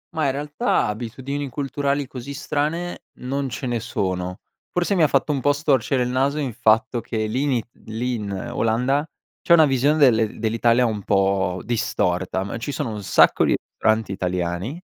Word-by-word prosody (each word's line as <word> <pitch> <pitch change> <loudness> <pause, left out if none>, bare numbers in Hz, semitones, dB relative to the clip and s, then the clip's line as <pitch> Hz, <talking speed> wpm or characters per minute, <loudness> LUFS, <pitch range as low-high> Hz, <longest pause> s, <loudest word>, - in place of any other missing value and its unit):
Mah, 155 -2 +1
in - - +2
realtà, 145 -1 0
abitudini 130 +6 -4
culturali 140 +1 -1
così 135 +2 -8
strane, 155 +4 -2 0.2
non 135 +1 -2
ce 115 +3 -5
ne 120 -2 -1
sono; 95 -5 -2 0.4
forse, 180 +3 0
mi 185 - +2
ha 155 - +6
fatto 140 +1 +1
un 140 -2 -1
po' 145 +2 +3
storcere 135 -3 +1
in 125 - -2
naso 135 +3 +1
il 135 -5 -2
fatto 115 +1 +2
che 110 -1 -2
l’ini 125 +2 0 0.2
lì 120 +3 -2
in 105 -3 -5 0.2
Olanda 125 +6 +1 0.4
c'è - - +4
una 160 -2 +7
visione 140 +2 +2
del 115 -7 +3
dell'Italia 115 +2 +2
un 110 -3 -2
po' 95 -2 +1
distorta, 95 -5 -1
m 100 +3 -5
ci 145 - -4
sono 140 -5 -3
un 105 -1 -5
sacco 95 - +4
di - - +3
ristoranti 110 -2 0
italiani 90 - -2
125 Hz, 175 wpm, -22 LUFS, 110-140 Hz, 0.4 s, una